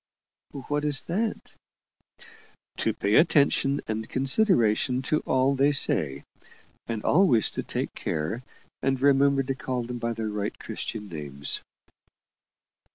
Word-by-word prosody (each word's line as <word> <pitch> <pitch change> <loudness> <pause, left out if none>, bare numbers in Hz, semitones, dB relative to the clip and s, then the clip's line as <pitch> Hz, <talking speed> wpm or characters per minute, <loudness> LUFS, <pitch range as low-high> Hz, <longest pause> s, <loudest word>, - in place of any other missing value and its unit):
"What 145 0 -1
is 145 -2 +3
that?" 215 +6 -3 1.2
"To - - 0
pay 100 +2 +1
attention 145 -3 +3
and 110 0 -4
consideration 130 - +2
to 155 +4 +1
all 130 +1 +2
they 140 +2 +3
say; 70 - +1 0.6
and 115 -2 -4
always 145 - +4
to - - -3
take - - -4
care 80 +10 -3 0.4
and 135 0 0
remember 140 0 +3
to 135 +1 -2
call 130 -1 -3
them 120 +1 -6
by 115 0 -2
their 110 -1 -4
right 105 -1 -4
Christian 105 -2 -6
names." 70 -5 -3
130 Hz, 125 wpm, -26 LUFS, 110-140 Hz, 1.2 s, always